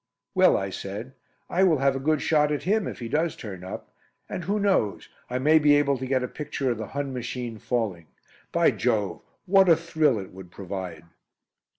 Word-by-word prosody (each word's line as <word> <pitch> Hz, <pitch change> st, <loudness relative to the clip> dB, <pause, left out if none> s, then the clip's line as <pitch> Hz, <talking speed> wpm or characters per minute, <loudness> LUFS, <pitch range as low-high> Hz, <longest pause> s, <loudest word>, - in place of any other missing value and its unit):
"Well," -, -, +5 dB
I 95 Hz, 0 st, -3 dB
said, 105 Hz, +8 st, -6 dB, 0.3 s
"I 185 Hz, -, 0 dB
will 170 Hz, -5 st, +4 dB
have 135 Hz, 0 st, +2 dB
a -, -, -2 dB
good 155 Hz, +2 st, +1 dB
shot 150 Hz, -1 st, +3 dB
at 150 Hz, -, -2 dB
him 210 Hz, +3 st, +1 dB
if -, -, -5 dB
he 120 Hz, -, -6 dB
does 155 Hz, +6 st, 0 dB
turn 95 Hz, -5 st, -8 dB
up. 95 Hz, -, -8 dB, 0.3 s
And 180 Hz, -, -5 dB
who 205 Hz, +3 st, 0 dB
knows 190 Hz, -, +1 dB, 0.2 s
I 125 Hz, -, -1 dB
may 155 Hz, +5 st, +5 dB
be 145 Hz, -1 st, +5 dB
able 145 Hz, -1 st, +3 dB
to 130 Hz, -, -4 dB
get 130 Hz, -1 st, +1 dB
a -, -, -1 dB
picture 145 Hz, -2 st, -3 dB
of 115 Hz, -, -3 dB
the 110 Hz, -, -4 dB
Hun 140 Hz, -2 st, -2 dB
machine 125 Hz, -2 st, -5 dB
falling. 105 Hz, -11 st, -2 dB, 0.4 s
By -, -, +4 dB
Jove, 100 Hz, -6 st, -1 dB, 0.2 s
what 190 Hz, 0 st, +5 dB
a 165 Hz, -, +8 dB
thrill 160 Hz, -5 st, +1 dB
it 95 Hz, -2 st, -7 dB
would 95 Hz, -1 st, -11 dB
provide!" 95 Hz, -3 st, -6 dB
130 Hz, 205 wpm, -26 LUFS, 105-155 Hz, 0.4 s, a